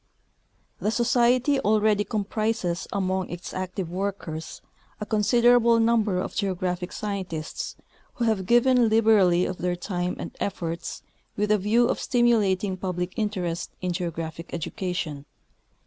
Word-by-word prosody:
The 210 - 0
Society 245 +4 +3
already 215 -2 +3
comprises 210 -3 -2
among 190 -1 -1
its 175 +1 -7
active 185 -1 -4
workers 180 -4 -4 0.4
a 210 - -4
considerable 235 +2 +4
number 225 -4 +2
of - - -4
geographic 180 -2 -2
scientists, 185 -7 -4 0.4
who 240 - -2
have 205 -5 0
given 240 0 +4
liberally 210 -6 +4
of 185 - -4
their 180 0 0
time 180 0 -3
and - - -7
efforts 170 -3 -4 0.3
with 210 +1 +1
a 210 - +4
view 225 +5 +3
of - - -1
stimulating 210 -6 +2
public 180 -1 -3
interest 185 -6 -3
in 180 -1 -2
geographic 165 -1 -5
education. 165 -4 -4
200 Hz, 125 wpm, -25 LUFS, 180-225 Hz, 0.4 s, considerable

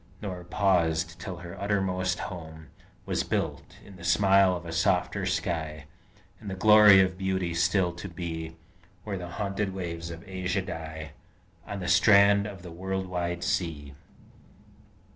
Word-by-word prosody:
Nor 90 -4 -6
paused, 85 -3 +1
till 90 0 -6
her 85 0 -9
uttermost 95 -3 0
home 80 -3 -8 0.4
Was - - 0
built, - - -3
in 100 -2 -13
the 85 - -12
smile 95 +1 +4
of 85 0 -7
a 85 - -6
softer 80 - +1
sky 80 -3 -2 0.5
And 105 - -8
the 95 - -4
glory 105 -1 +8
of 95 0 0
beauty 95 -2 -1
still 90 +2 +2
to 85 +3 -8
be, 80 -2 -6 0.5
Where 100 -3 -4
the 90 -1 -7
haunted 100 -1 -2
waves 85 -2 -5
of 85 0 -9
Asia 95 0 -2
die 80 -3 -7 0.6
On 100 -1 -5
the 90 - -4
strand 100 +2 +5
of 95 -4 -9
the 90 - -9
world 95 +2 -3
wide 85 -1 -3
sea! 75 -5 -2
90 Hz, 150 wpm, -27 LUFS, 85-95 Hz, 0.6 s, glory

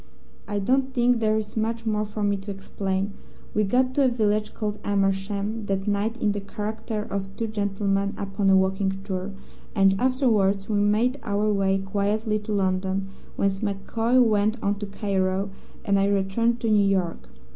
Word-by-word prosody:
"I 205 - -2
don't 260 +6 +1
think 245 -1 +3
there 215 -1 +2
is 215 -1 -4
much 225 +1 -1
more 215 -1 0
for 210 0 -4
me 205 0 +2
to 195 +2 -9
explain. 195 0 -3 0.4
We 210 - +2
got 255 +5 +2
to 275 0 +3
a - - +5
village 215 -3 0
called 210 -1 -3
Amersham 200 +2 -1
that 195 0 -2
night 210 +3 0
in 210 - +2
the 205 0 -3
character 215 +1 -4
of 195 -1 -5
two 230 - -2
gentlemen 200 -2 -1
upon 195 0 0
a 190 - +6
walking 190 0 +1
tour, 190 -1 -3 0.5
and 195 -1 +5
afterwards 220 -7 +2
we 210 -2 +1
made 220 +6 +2
our 210 -1 0
way 195 -1 +2
quietly 205 +3 0
to 210 +1 -7
London, 190 -1 0 0.3
whence 195 -1 0
MacCoy 225 +4 +1
went 215 -2 +3
on 200 0 0
to 205 - -4
Cairo 195 -1 -1 0.3
and 200 -1 +3
I 195 - +3
returned 200 +4 +1
to 225 - +1
New 205 -1 +5
York. 185 -4 -1
205 Hz, 175 wpm, -25 LUFS, 195-220 Hz, 0.5 s, a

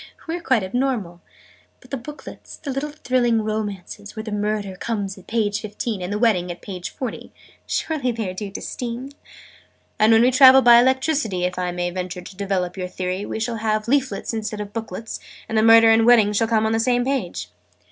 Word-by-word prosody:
We 325 - -2
are 350 - -5
quite 255 - +2
abnormal. 200 -5 -2 0.6
But - - -20
the 275 - -2
booklets 290 +5 -10
the 285 - -5
little 275 +3 -3
thrilling 245 -6 +1
romances, 210 -1 -5
where 220 - -5
the 220 - -6
Murder 210 -2 -2
comes 200 -1 -3
at 190 - -16
page 215 -3 0
fifteen, 215 -1 -4
and 180 +2 -4
the 205 - -1
Wedding 210 -6 +2
at 175 - -10
page 180 -3 -6
forty 255 -3 -6 0.4
surely 280 -6 -1
they 225 -3 -3
are 185 - -4
due 200 +2 -5
to 195 - -7
Steam?" 245 +2 -5 0.9
"And 215 +1 +5
when 225 +1 +6
we 250 - +4
travel 260 +1 +8
by 235 -1 +8
Electricity 260 - +1
if 180 0 -1
I 180 -1 -1
may 175 0 -2
venture 180 0 -5
to 185 - -11
develop 190 -2 -2
your 185 -1 -3
theory 185 +2 -4
we - - -4
shall 230 +1 -2
have 215 0 -1
leaflets 255 -6 0
instead 215 -1 -4
of 205 -1 -6
booklets, 225 -1 -6 0.3
and 225 - -4
the 220 - +4
Murder 225 0 +7
and 225 0 +5
the - - +2
Wedding 230 -4 +6
will 225 - +2
come 220 -1 +2
on 220 - +1
the 225 - +1
same 245 +1 +1
page." 270 0 -2
220 Hz, 210 wpm, -22 LUFS, 195-245 Hz, 0.9 s, travel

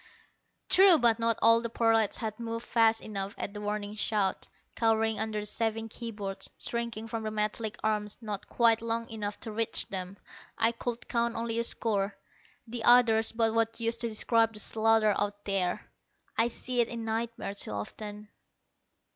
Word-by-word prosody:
True, 380 -2 +7
but 235 -4 +3
not 230 -1 +2
all 230 +1 +6
the 235 - -3
prolats 225 -2 +2
had 220 -1 -4
moved 230 0 -4
fast 225 -1 +3
enough 200 -2 -4
at 200 - -4
the 205 - -7
warning 210 0 -3
shout. 210 -2 0 0.3
Cowering 225 -1 +2
under 220 -1 -2
the - - -6
saving 225 +1 -1
key 235 +1 -6
boards, 200 -3 -6
shrinking 235 -2 -3
from 225 0 -4
the 215 - -3
metallic 215 0 -2
arms 210 -1 -1
not 210 -4 -6
quite 230 -2 +3
long 230 0 -2
enough 210 -2 -4
to 225 - -6
reach 225 +1 +1
them, 190 0 -5 0.4
I 225 0 +3
could 235 0 -5
count 235 -1 0
only 230 0 -1
a - - +1
score. 205 -4 0 0.5
The 235 -1 -5
others 225 -2 +5
but 225 -1 +1
what 225 0 0
use 230 0 0
to 235 0 -2
describe 225 +1 +3
the 210 - -4
slaughter 220 0 +3
out 205 0 -3
there! 195 0 -1 0.5
I 230 - +3
see 245 +1 0
it 235 - +1
in 230 -1 -6
nightmares 225 -2 -3
too - - 0
often. 210 - -7
225 Hz, 175 wpm, -29 LUFS, 210-230 Hz, 0.5 s, True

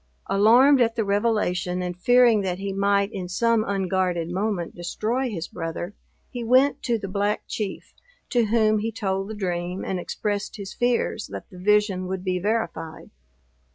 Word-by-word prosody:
Alarmed 245 +7 +5
at 230 -1 +2
the 220 - 0
revelation, 200 -4 0
and 180 -1 -3
fearing 240 +2 +4
that 185 -2 -2
he 195 0 -4
might 200 +1 +2
in 185 -2 -5
some 230 +4 +2
unguarded 185 -4 -1
moment 190 -2 -2
destroy 225 +9 -2
his 170 -6 -4
brother, 165 +3 -5 0.4
he 245 -2 -5
went 255 +4 +3
to 235 -2 0
the 200 -2 -6
Black 205 +2 -1
Chief, 205 -3 -5 0.4
to 240 -2 +3
whom 215 -1 +3
he 225 +2 -2
told 195 -3 -2
the 220 - -5
dream, 180 -2 -3
and 185 - -2
expressed 205 +3 -3
his 200 -2 -7
fears 245 0 0
that - - -8
the 180 - -11
vision 205 -1 +2
would 185 0 -4
be 185 -1 -1
verified. 180 -6 -3
200 Hz, 165 wpm, -24 LUFS, 185-225 Hz, 0.4 s, Alarmed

